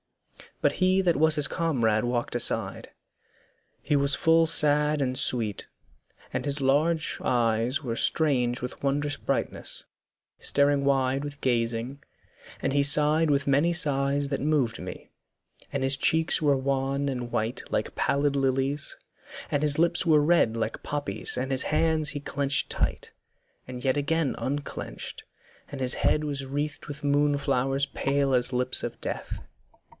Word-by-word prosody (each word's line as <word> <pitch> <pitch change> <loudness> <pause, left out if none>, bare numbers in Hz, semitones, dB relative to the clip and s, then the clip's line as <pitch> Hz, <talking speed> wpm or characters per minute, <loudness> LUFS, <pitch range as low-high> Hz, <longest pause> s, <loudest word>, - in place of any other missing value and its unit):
But 145 - +2
he 185 +3 +2
that 175 -3 +1
was 160 +1 +3
his 150 -2 +3
comrade 120 -10 0
walked 120 0 -2
aside; 120 - +2 0.9
He 150 - 0
was 140 -1 +4
full 165 0 +3
sad 150 -1 +4
and 130 -1 -1
sweet, 110 -5 0 0.7
and - - -3
his 145 0 +3
large 150 +4 +1
eyes 120 +3 0
Were 115 -3 -3
strange 125 -5 0
with 125 - -7
wondrous 145 +1 0
brightness, - - -3 0.5
staring 140 -1 +2
wide 135 0 +1
With 145 0 -8
gazing; 120 +2 -2 0.6
and - - -1
he 145 - +3
sighed 150 +2 +3
with 140 -1 0
many 145 +5 +2
sighs 140 -3 +2
That 140 - -3
moved 140 -6 0
me, 90 - -9 0.6
and 140 - -2
his 135 +1 +2
cheeks 160 +3 +2
were 145 -3 +2
wan 135 +1 -1
and 125 -3 -4
white 110 +2 -2
Like - - -2
pallid 140 0 0
lilies, 135 +1 -1 0.5
and 145 - 0
his 150 -1 +3
lips 170 +2 +2
were 155 -2 +5
red 150 -7 +2
Like 115 0 -3
poppies, 145 0 -2
and 130 +2 -3
his 130 0 +1
hands 155 0 +1
he 145 - -1
clenched 140 -1 -1
tight, - - -3 0.5
And 125 -1 -8
yet 130 +1 +1
again 155 0 -1
unclenched, 145 +2 -5 0.5
and 140 - -7
his 130 -1 +2
head 155 - +1
Was 140 -2 -4
wreathed 145 +2 -4
with 150 0 -8
moon 145 0 +2
flowers 135 0 0
pale 140 0 -1
as 125 +1 +2
lips 125 +1 +4
of - - -6
death. - - -5
140 Hz, 150 wpm, -26 LUFS, 130-150 Hz, 0.9 s, were